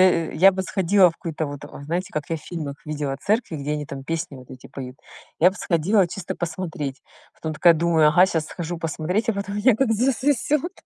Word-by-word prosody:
да 170 -3 +4
я 190 +5 +6
бы 190 - -3
сходила 190 0 +4
в 165 - -17
какую-то 160 -2 -4
вот 145 -1 -7 0.2
Знаете, 175 +5 -3
как 150 -1 -2
я 165 - -1
в 155 - -10
фильмах 155 -5 -5
видела 145 -3 -3
церкви, 210 -6 0
где 145 +1 -3
они 150 -1 -3
там 135 -1 -7
песни 165 -2 -3
вот 130 -1 -14
эти 130 -1 -11
поют. 130 -1 -8 0.4
Я 180 - +7
бы 190 - -11
сходила 180 +3 +2
чисто 180 +2 -6
посмотреть. 160 -6 -4 0.3
Потом 160 -1 -5
такая 170 +3 +6
думаю: 165 -1 +3
ага, 180 +5 +6
щас 160 -4 -1
схожу 175 0 -5
посмотреть, 165 +7 -2
а - - 0
потом 200 0 -4
меня 230 +4 +4
как 225 0 +1
засосет, 270 - +1
170 Hz, 210 wpm, -23 LUFS, 150-195 Hz, 0.4 s, Я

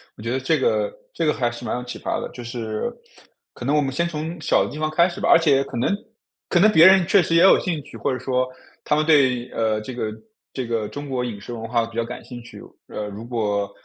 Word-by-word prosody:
我 - - -13
觉 115 +2 -3
得 130 - 0
这 130 - +1
个 - - +1 0.2
这 - - -1
个 150 - +3
还 120 -3 0
是 120 0 -9
蛮 - - -2
有 125 - -5
启 125 - -7
发 - - -2
的。 - - -4
就 125 - -8
是 115 - -4 0.6
可 120 - -8
能 140 +3 +2
我 150 - +4
们 135 -2 -1
先 170 +6 0
从 165 +1 -5
小 155 - +3
的 - - -7
地 150 - -7
方 155 0 -1
开 170 +3 +4
始 175 - -8
吧， - - 0
而 - - +8
且 140 -5 +3
可 130 - -7
能 125 +11 +1 0.5
可 175 - +3
能 210 +4 +6
别 160 -4 +7
人 190 -1 +7
确 195 0 +5
实 165 - 0
也 165 - +6
有 190 - +7
兴 165 -5 -2
趣， 145 - -11
或 - - -1
者 130 - -2
说 130 0 0 0.4
他 - - +1
们 155 0 +1
对， 130 -6 +3
呃， 110 -1 0
这 120 +4 -7
个 110 -3 -2 0.4
这 130 -3 -4
个 115 -2 -1
中 145 0 -7
国 130 -2 -1
饮 115 -5 -5
食 110 +4 -8
文 115 -1 -6
化 115 0 +1
比 115 0 -13
较 115 - 0
感 125 - -8
兴 120 -2 -9
趣。 - - -12 0.3
呃， 105 - -5
如 105 +2 -8
果 105 -4 -1
130 Hz, 295 characters per minute, -22 LUFS, 115-155 Hz, 0.6 s, 而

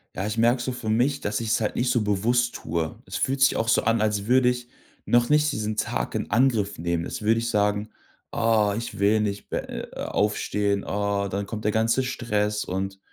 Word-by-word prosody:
Ja, 95 - -2
ich 105 +2 -3
merke 120 +2 +3
so 130 - -2
für 120 -3 -5
mich, 125 +6 +1
dass 105 0 -1
ich's 115 0 0
halt 105 - -1
nicht 125 +1 +1
so 120 - +2
bewusst 115 +4 +1
tue. 80 -1 -3
Es - - -5
fühlt 135 +1 -1
sich 135 - +5
auch 115 - -1
so 115 - +3
an, 115 0 +2
als 105 -2 0
würde 125 +2 +4
ich 125 -1 -4 0.4
noch 120 0 +3
nicht 150 0 +3
diesen 110 -3 -2
Tag - - -2
in - - -3
Angriff 115 -4 +2
nehmen. 85 0 -1
Als - - -5
würde 110 +2 +2
ich 115 +1 -2
sagen: 105 0 +1 0.4
„Ah, 115 -3 +2
ich 115 -3 -6
will 105 +2 +3
nicht 100 -1 -3
be - - -3
äh, - - -5 0.2
äh, - - -4
aufstehen, 105 -1 0
ah, 100 0 -1
dann 100 +1 -3
kommt 110 +1 -6
der 105 - +3
ganze 115 +4 +2
Stress 105 -5 -1
und 95 +1 -4
110 Hz, 220 wpm, -25 LUFS, 100-120 Hz, 0.4 s, sich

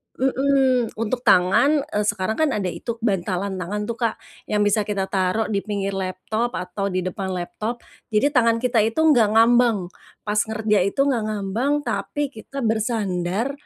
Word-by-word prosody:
mhm, 265 -2 +1
untuk 230 +3 -2
tangan, 275 +12 +4
eee, 210 0 0
sekarang 205 +1 -1
kan 315 -2 +3
ada 190 -4 -1
itu 235 +5 -5
bantalan 190 -2 -1
tangan 205 +4 -3
tuh 230 +3 -5
Kak, 230 -2 0 0.3
yang 210 0 +1
bisa 205 0 +1
kita 200 -2 -1
taruh 190 +3 0
di 200 - +1
pinggir 200 -1 -2
laptop 195 +5 -3
atau 185 +2 -3
di 185 -1 -2
depan 185 +2 -4
laptop, 215 +7 -5 0.2
jadi 225 +7 +2
tangan 230 -4 +3
kita 245 -2 +2
itu 230 +8 0
enggak 235 -9 +4
ngambang, 230 -5 +4 0.3
pas 210 0 0
kerja 220 -1 +1
itu 200 - -5
enggak 265 -5 0
ngambang 215 +6 -1
tapi 290 -1 -2
kita 270 +4 -7
bersandar, 220 -1 -1
215 Hz, 165 wpm, -22 LUFS, 195-240 Hz, 0.3 s, tangan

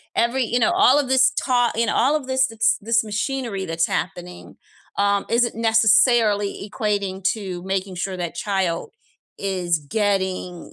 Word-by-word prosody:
Every 245 +2 +1
you 240 +2 0
know, 345 +7 +2
all 350 -7 +5
of 280 - -1
this 265 0 +4
taught 245 -3 0
you 235 - +2
know, 220 - -1
all 275 +5 +2
of 280 -4 -5
this 260 0 +2 0.3
this 230 +2 +1
machinery 215 -1 -3
that's 165 0 0
happening, 180 -1 -5 0.4
um, 200 0 +1
isn't 235 0 +1
necessarily 220 -2 +2
equating 200 -3 -2
to 185 -5 -6
making 190 0 -3
sure 185 +1 -3
that 175 -2 -5
child 185 -3 -2 0.5
is 180 -4 -1
getting 190 +1 -2
205 Hz, 150 wpm, -22 LUFS, 190-240 Hz, 0.5 s, all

